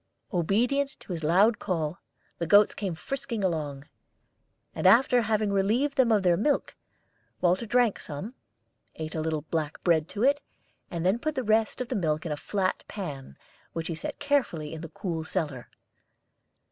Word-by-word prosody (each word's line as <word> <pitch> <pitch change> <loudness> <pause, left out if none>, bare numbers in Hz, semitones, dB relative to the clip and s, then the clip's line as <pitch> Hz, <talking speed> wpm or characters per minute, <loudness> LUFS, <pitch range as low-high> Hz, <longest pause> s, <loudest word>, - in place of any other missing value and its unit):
Obedient 245 - +1
to - - -10
his 165 -2 -4
loud 195 +8 +4
call, 165 -3 -2 0.4
the 170 - -1
goats 205 +3 +6
came 195 -5 -3
frisking 245 +2 -4
along; 150 -5 -2 0.9
and - - +1
after 245 0 +6
having 215 -2 +1
relieved 230 +9 +1
them 255 -4 +4
of 210 -3 +3
their 175 -2 +4
milk, 280 - 0 0.6
Walter 185 +5 +2
drank 240 -2 +2
some, 155 - -6 0.6
ate 155 0 -5
a 160 - -2
little 155 -2 -1
black 155 -1 -3
bread 165 -3 +2
to 210 - -2
it, 285 +2 +4 0.5
and 170 0 -3
then 195 +6 +3
put 310 +3 -2
the 260 - -1
rest 220 +2 +2
of 250 - -4
the - - -1
milk 155 -5 0
in 165 - -3
a - - 0
flat 185 +5 -1
pan, 140 - -7 0.4
which 165 0 -3
he - - -1
set 155 - -4
carefully 245 - 0
in 160 - -6
the 165 - -7
cool 165 -2 -4
cellar. 150 -7 -3
185 Hz, 170 wpm, -28 LUFS, 160-230 Hz, 0.9 s, goats